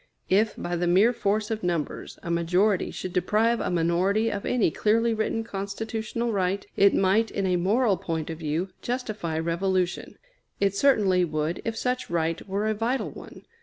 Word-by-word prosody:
If, 210 +3 +3
by 175 - -3
the 175 0 0
mere 195 +8 +4
force 210 -1 -1
of 220 -1 -2
numbers, 170 -4 -3
a 170 - -3
majority 180 +4 +2
should 185 - -6
deprive 215 +6 +2
a - - -1
minority 180 +6 +1
of 200 -1 -4
any 240 -9 +2
clearly 230 +5 +2
written 220 +1 -1
constitutional 220 +3 -3
right, 195 -1 -1
it 200 0 +5
might, 205 +4 +3
in 195 - -2
a 180 -1 +2
moral 200 +4 +2
point 165 -3 -3
of 160 - -7
view, 160 +4 -2
justify 215 -10 -3
revolution; 175 +2 -1 0.4
it 200 -1 +2
certainly 200 -8 +3
would 155 0 -2
if 225 0 -2
such 250 +2 -2
right 165 -1 -1
were 200 +2 -1
a 220 - +1
vital 230 +5 -1
one. - - -12
195 Hz, 170 wpm, -26 LUFS, 175-220 Hz, 0.4 s, it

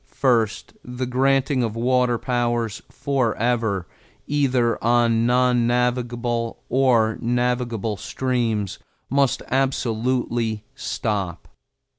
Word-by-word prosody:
First, 115 -6 0
the 125 +1 -4
granting 135 +1 +2
of 115 -2 -2
water 125 0 +2
powers 120 -3 -1
forever, 115 -6 0 0.4
either 130 -5 +1
on 115 -1 +3
non 125 -1 +3
navigable 120 -1 -1
or 120 -4 +3
navigable 120 -3 -1
streams, 115 -4 -2 0.3
must 140 -1 +2
absolutely 120 -3 0
stop. 100 -6 -3
120 Hz, 85 wpm, -23 LUFS, 115-125 Hz, 0.4 s, on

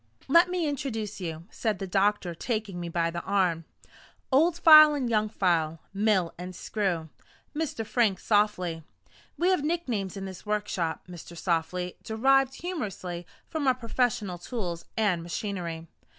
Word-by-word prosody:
"Let 340 +5 +6
me 360 -2 -1
introduce 225 -8 -3
you," 165 -2 -5
said 215 -4 -1
the 195 - -4
doctor, 195 -1 +1
taking 210 0 -3
me 170 -1 -4
by 165 0 0
the 170 0 -4
arm. 175 -5 +1 0.7
"Old 325 +6 +4
File 310 -3 +9
and 265 -4 -1
Young 215 -2 +1
File, 165 -6 +1
Mill 195 -4 +1
and 180 +1 -7
Screw 175 -6 -2 0.5
Mr. 295 -8 -2
Frank 215 -5 +1
Softly. 205 -6 +1 0.6
We 350 +2 +2
have 370 -6 +2
nicknames 245 - -2
in 195 - -5
this 190 -1 -8
workshop, 205 -6 -2
Mr. 175 -1 -10
Softly, 180 +1 -1
derived 270 +4 +2
humorously 195 - -5 0.2
from 310 -4 -2
our 260 - +4
professional 230 -6 -1
tools 175 -5 -4
and 200 -6 +2
machinery. 170 -2 -4
205 Hz, 145 wpm, -28 LUFS, 175-250 Hz, 0.7 s, File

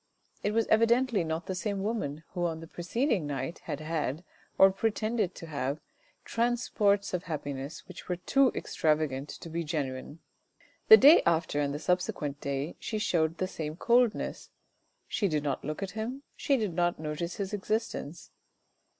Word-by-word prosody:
It 205 - 0
was 225 -1 +3
evidently 230 -1 +3
not 160 +1 -3
the 190 - -3
same 195 +1 -2
woman 160 -9 -2
who 175 -1 -1
on 160 -1 -4
the 165 - -8
proceeding 180 - -1
night 140 +2 -4
had 145 - -4
had, 155 -1 -2 0.3
or 195 0 +8
pretended 215 -1 -1
to - - -8
have, 140 -2 -3 0.5
transports 230 -4 +1
of 180 -1 -2
happiness 145 -3 -5
which 185 0 -11
were 180 - +1
too 260 +9 +3
extravagant 150 -3 0
to - - -8
be 165 +1 -3
genuine. 145 -2 -4 0.7
The 440 - +12
day 300 0 +8
after, 160 -3 +1
and 140 -1 0
the 145 - -3
subsequent 150 -4 -1
day 140 +3 -3
she 220 - -3
showed 165 -5 +1
the 185 - -1
same 155 -4 -5
coldness; 235 +4 +1 0.6
she 205 - 0
did 155 -4 0
not 140 -3 -2
look 155 +6 -4
at 195 - -4
him, 240 +6 -5
she 275 - +1
did 210 -7 -1
not 175 0 +1
notice 155 +3 -3
his 200 0 -4
existence. 205 -6 -3
175 Hz, 165 wpm, -29 LUFS, 150-215 Hz, 0.7 s, The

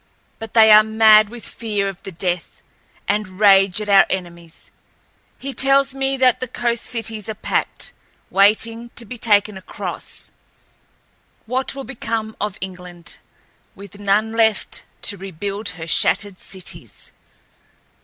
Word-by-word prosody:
But 225 0 -9
they 220 -1 +7
are 215 0 +10
mad 220 -1 +5
with 240 0 -10
fear 210 -3 -3
of 195 -1 -7
the 195 - -8
Death, 175 0 -3 0.4
and 205 -3 -2
rage 195 -2 +5
at 210 - -5
our 195 -1 +6
enemies. 170 -3 -7 0.7
He 275 0 -5
tells 275 0 +3
me 270 0 -1
that 255 -2 +3
the 255 - -4
coast 235 -1 -2
cities 225 -3 -4
are 220 - -4
packed... - - -2 0.4
waiting 225 +4 +2
to 235 - 0
be 245 +2 -9
taken 210 -2 +3
across. 190 - -7 1.1
What 260 +4 -2
will 275 - -6
become 225 -4 -4
of 210 -2 -3
England, 180 -2 -8 0.6
with 200 0 -12
none 205 +2 +1
left 220 -2 +1 0.2
to 200 - -1
rebuild 195 +2 -4
her 165 - -6
shattered 190 +3 +1
cities!" 190 -2 -8
210 Hz, 135 wpm, -20 LUFS, 195-230 Hz, 1.1 s, are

